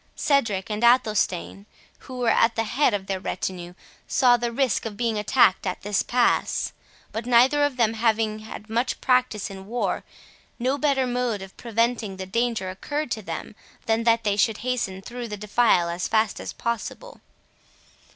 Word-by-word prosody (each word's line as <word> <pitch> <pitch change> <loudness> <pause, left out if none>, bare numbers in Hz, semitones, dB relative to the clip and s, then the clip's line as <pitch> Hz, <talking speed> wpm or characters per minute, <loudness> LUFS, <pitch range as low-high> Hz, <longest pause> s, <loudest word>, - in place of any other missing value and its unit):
Cedric 225 -9 +1
and 210 +2 -2
Athelstane, 215 -5 +2 0.3
who 255 - -10
were 245 -2 +1
at 230 +1 +3
the 225 - +1
head 240 +1 +2
of 195 -2 -4
their 195 -1 -2
retinue, 180 -1 -4 0.3
saw 250 -2 +4
the 240 0 -2
risk 250 -3 0
of 210 -2 -8
being 230 -2 0
attacked 210 -3 +3
at 185 - -4
this 205 0 +1
pass; 245 0 +1 0.4
but 225 +2 -5
neither 250 +4 +5
of 290 -3 0
them 225 -2 +2
having 220 -1 +1
had 215 0 -9
much 235 +3 -1
practice 250 -6 +1
in 190 0 -10
war, 240 +3 -2 0.5
no 260 +4 0
better 275 -3 +2
mode 245 -5 -1
of 190 - -12
preventing 230 -3 -1
the 190 - -5
danger 225 -2 -1
occurred 290 +8 -4
to 220 - -2
them 165 -1 -6 0.3
than 225 +1 +1
that 230 0 +3
they 205 -2 +1
should 215 +1 +2
hasten 215 -7 -2
through 240 +1 -6
the 210 -1 -6
defile 210 -3 +2
as 170 +1 -2
fast 220 -1 +1
as - - -5
possible. 235 - -5
225 Hz, 170 wpm, -24 LUFS, 205-245 Hz, 0.5 s, neither